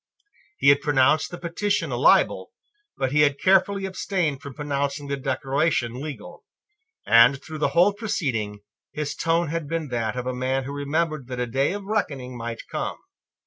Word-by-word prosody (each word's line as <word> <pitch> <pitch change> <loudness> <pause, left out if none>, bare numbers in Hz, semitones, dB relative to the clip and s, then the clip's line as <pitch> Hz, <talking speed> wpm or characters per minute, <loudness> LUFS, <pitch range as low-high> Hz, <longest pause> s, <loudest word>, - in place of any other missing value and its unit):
He 140 - +4
had 140 0 +5
pronounced 145 +1 +3
the 175 - -7
petition 200 +5 -1
a - - -1
libel: - - +3 0.5
but 130 -1 -1
he 150 +1 +3
had 145 -1 +3
carefully 195 +1 +3
abstained 180 -6 -2
from 140 -3 -9
pronouncing 145 0 -2
the 140 - -1
Declaration 135 -1 0
legal; 150 -1 -8 0.6
and, 120 +4 +6
through 155 +1 -8
the - - +2
whole 185 +4 +6
proceeding, 135 - -2 0.3
his 150 -1 -3
tone 165 -1 0
had 165 -1 -3
been 160 -1 -3
that 115 -2 -2
of 125 - -3
a 130 - -2
man 130 +1 -1
who 140 +2 -6
remembered 145 0 -2
that 125 -1 -5
a 125 - 0
day 135 +6 0
of 205 0 -5
reckoning 140 - -2
might 115 -1 -6
come. - - -4
145 Hz, 175 wpm, -24 LUFS, 130-165 Hz, 0.6 s, and